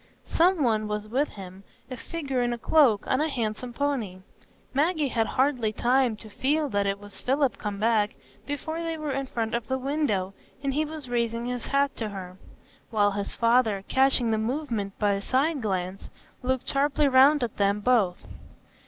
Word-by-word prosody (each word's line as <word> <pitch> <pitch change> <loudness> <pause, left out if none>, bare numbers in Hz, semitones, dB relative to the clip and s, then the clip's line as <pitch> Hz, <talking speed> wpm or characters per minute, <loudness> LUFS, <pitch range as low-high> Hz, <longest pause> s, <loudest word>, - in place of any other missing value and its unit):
Some 345 -1 +3
one 215 -3 +1
was 210 0 -3
with 265 +7 +1
him,—a 195 +6 -11
figure 270 -1 -3
in 240 0 0
a - - -4
cloak, 240 -5 +3
on 260 - +1
a 315 - +1
handsome 240 -1 -3
pony. 240 -9 -2 0.5
Maggie 300 +1 +1
had 225 -2 0
hardly 255 -5 +1
time 245 +1 +2
to 215 - -11
feel 290 +7 0
that 200 -3 0
it 195 0 0
was 205 0 -8
Philip 270 0 0
come 205 -2 -4
back, 215 -1 +2 0.3
before 315 +3 -4
they 330 -1 -3
were 305 -2 -3
in 270 0 -2
front 225 -3 -3
of 235 -1 -2
the 260 - 0
window, 255 -9 -1 0.3
and 275 -1 0
he 305 +3 +1
was 305 -3 -7
raising 235 -1 -1
his 245 -1 -4
hat 280 0 +1
to 220 -2 -3
her; 185 -2 -8 0.5
while 205 -3 +2
his 200 0 -3
father, 230 -4 +2
catching 265 -3 +3
the 220 - +1
movement 225 -5 -3
by 205 -1 +2
a 195 - -2
side 275 +6 +1
glance, 190 -2 -3 0.3
looked 260 0 -1
sharply 285 +1 +2
round 270 +2 +6
at 230 - -4
them 200 0 +2
both. 210 -6 +1
245 Hz, 180 wpm, -26 LUFS, 210-280 Hz, 0.5 s, round